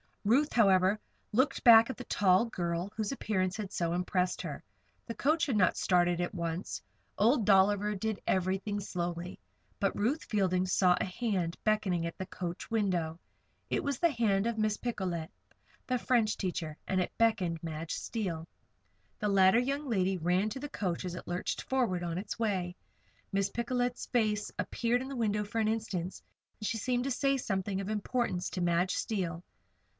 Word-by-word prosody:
Ruth, 265 +9 +3
however, 195 -2 +4 0.3
looked 260 +6 +1
back 230 -1 +9
at 260 - -4
the 250 - -6
tall 195 -2 +3
girl 175 -3 -3
whose 215 -2 -2
appearance 185 -8 -1
had 205 -3 -5
so 170 -3 -1
impressed 180 +1 0
her. - - -6 0.4
The 230 - -4
coach 315 +4 +2
had 250 -6 +1
not 185 -3 +3
started 175 -1 +2
on 175 - +2
at - - -9
once. 165 - -3 0.4
Old 225 +2 +3
Dolliver 205 +1 +4
did 215 +1 -2
everything 190 +2 0
slowly. 175 -2 -4 0.4
But 195 - +1
Ruth 255 +10 0
Fielding 185 -3 +1
saw 180 -1 +4
a - - 0
hand 185 -4 -2
beckoning 200 -6 +1
at 170 - -5
the 185 - -5
coach 175 -2 -5
window. 180 -7 0 0.5
It - - 0
was 280 -1 -2
the 340 -2 +4
hand 220 -5 +1
of 235 -1 -2
Miss 215 -1 +1
Picolet, 180 -9 -3 0.6
the 255 -1 0
French 230 -3 +2
teacher, 165 -5 -3
and 190 - +1
it - - -2
beckoned 185 -8 +2
Madge 160 0 -4
Steele. 175 -8 -3 0.7
The 210 - 0
latter 190 +2 +5
young 275 +4 -1
lady 190 -5 +1
ran 180 +5 +1
to 265 - -5
the 290 +2 -6
coach 185 - -2
as 180 -1 -4
it - - -8
lurched 175 +1 -2
forward 235 -10 0
on 170 -1 -2
its 200 +4 -5
way. 185 -5 -1 0.6
Miss 195 0 +1
Picolet's 245 +2 -2
face 215 -4 0
appeared 240 +1 0
at 265 - -6
the 275 - -5
window 210 -3 0
for 225 +3 -3
an 220 - +2
instant, 200 -5 -2 0.4
and 210 - -3
she 230 - -1
seemed 245 +2 0
to 275 - -2
say 275 +2 +2
something 195 -4 -2
of 195 - -5
importance 215 -3 -1
to 185 - -3
Madge 175 +1 +2
Steele. 175 -5 -2
200 Hz, 180 wpm, -31 LUFS, 180-230 Hz, 0.7 s, back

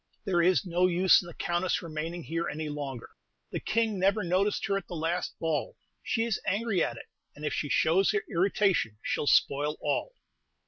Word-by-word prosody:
There 180 -4 +2
is 180 -2 +3
no 180 +1 +2
use 185 +1 +5
in 175 - -11
the 170 - -9
Countess 175 +2 -1
remaining 165 +1 -5
here 165 +2 -2
any 155 0 -4
longer; 140 -5 -6 0.4
the - - -2
King 220 -3 0
never 195 +3 +2
noticed 185 +4 +1
her 200 - 0
at 195 -2 -3
the 175 - -6
last 165 +2 -2
ball; 160 -4 -2 0.2
she 225 - 0
is 230 -4 -1
angry 205 -2 +1
at - - -3
it, - - -9 0.3
and 150 - -7
if 145 - -1
she 145 - -2
shows 175 +7 +3
her 425 +1 0
irritation 185 - +1
she - - -1
'll 145 - -3
spoil 145 +2 +3
all. 150 - -2
175 Hz, 195 wpm, -29 LUFS, 155-195 Hz, 0.4 s, use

